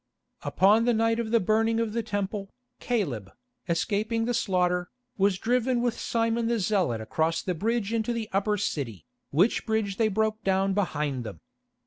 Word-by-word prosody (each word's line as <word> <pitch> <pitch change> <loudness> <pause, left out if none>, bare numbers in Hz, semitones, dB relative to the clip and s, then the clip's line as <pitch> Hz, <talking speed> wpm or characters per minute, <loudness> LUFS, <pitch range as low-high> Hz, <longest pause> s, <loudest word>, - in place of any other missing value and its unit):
Upon 210 +4 +3
the 240 -1 +3
night 225 +1 +2
of 230 -2 -2
the 230 +1 +4
burning 225 +3 +2
of 225 -2 -1
the 230 - 0
Temple, 205 -2 -3 0.3
Caleb, 140 - -2 0.4
escaping 215 +7 0
the 245 - 0
slaughter, 180 -5 +1 0.3
was 195 -1 +2
driven 245 +3 +1
with 240 -1 -1
Simon 230 0 0
the 235 0 +1
Zealot 185 - +1
across 160 +8 0
the 185 - -1
bridge 220 +4 -1
into 230 +1 0
the 230 -2 -3
Upper 210 +2 +1
City, 115 - -3 0.2
which 180 +11 +2
bridge 220 -3 -1
they 225 - +3
broke 215 +1 0
down 195 0 +2
behind 150 -9 -1
them. 105 -8 -8
210 Hz, 165 wpm, -27 LUFS, 180-230 Hz, 0.4 s, the